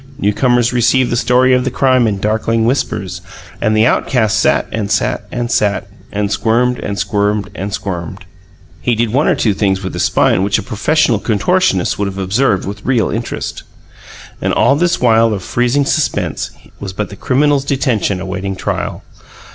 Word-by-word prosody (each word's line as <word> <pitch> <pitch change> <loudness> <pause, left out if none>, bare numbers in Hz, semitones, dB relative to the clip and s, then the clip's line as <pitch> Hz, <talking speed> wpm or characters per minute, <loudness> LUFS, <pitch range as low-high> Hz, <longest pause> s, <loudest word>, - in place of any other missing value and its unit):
Newcomers 120 +4 +1
received 125 +1 +2
the - - +1
story 125 +2 +3
of 125 0 +2
the 130 - -1
crime 130 -2 +2
in 105 -2 -1
darkling 110 +2 0
whispers; 95 -8 -2 0.4
and 110 -1 +1
the 110 - +4
outcast 110 -3 +1
sat - - +2
and 105 -3 -3
sat 105 0 -1
and 120 -1 -3
sat, 100 -1 0 0.2
and 100 0 -2
squirmed 125 +3 +1
and 100 - -4
squirmed 105 0 -1
and 100 +2 -5
squirmed. 95 -1 -5 0.6
(He 120 +8 +1
did 115 0 -1
one 140 +4 +2
or - - +3
two 105 - +1
things 95 -1 0
with 95 - -4
his - - -3
spine 90 - +2
which 100 +1 +1
a - - -4
professional 130 +1 +1
contortionist 110 - +1
would 100 - 0
have 95 0 -6
observed 100 +2 +1
with 100 +1 -7
real 120 -6 +1
interest.) - - -4 0.8
And - - 0
all 140 - +3
this 175 +3 +1
while 115 -2 +3
of 95 - -6
freezing 125 +7 +1
suspense 155 +2 -1 0.3
was 95 -2 -6
but 105 +2 -3
the - - -9
criminal's 140 +4 +1
detention 130 -9 0
awaiting 95 +1 -4
trial. - - -3
110 Hz, 175 wpm, -15 LUFS, 100-125 Hz, 0.8 s, the